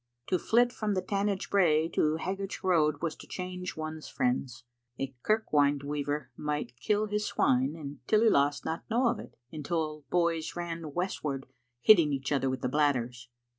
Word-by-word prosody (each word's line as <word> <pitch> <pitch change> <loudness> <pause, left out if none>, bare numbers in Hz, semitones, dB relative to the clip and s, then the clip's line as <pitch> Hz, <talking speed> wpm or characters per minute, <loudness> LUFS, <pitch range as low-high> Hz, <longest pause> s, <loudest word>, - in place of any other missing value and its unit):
To 185 - +2
flit 240 +5 +3
from 210 -2 -1
the 185 - +1
Tanage 200 0 -1
brae 165 -5 +4
to 155 -2 +1
Haggart'sroad 180 -5 0
was 165 -2 -1
to - - -12
change 180 -1 -5
one's 155 0 -5
friends. 125 -1 -1 0.4
A 135 0 -3
kirk 215 +2 0
wynd 145 -1 +3
weaver 145 -1 -3
might 150 -5 -3
kill 210 - +1
his 210 0 -1
swine 130 +4 +2
and 145 -3 -8
Tillyloss 145 -11 +3
not 160 +1 -3
know 240 +2 +3
of - - -2
it - - -11
until 155 -1 -3
boys 170 -2 0
ran 165 -3 -5
westward 150 -7 -2 0.4
hitting 165 - +6
each 135 +1 -3
other 135 -2 +1
with 130 - -3
the - - 0
bladders. 125 -4 0
155 Hz, 165 wpm, -30 LUFS, 145-185 Hz, 0.4 s, hitting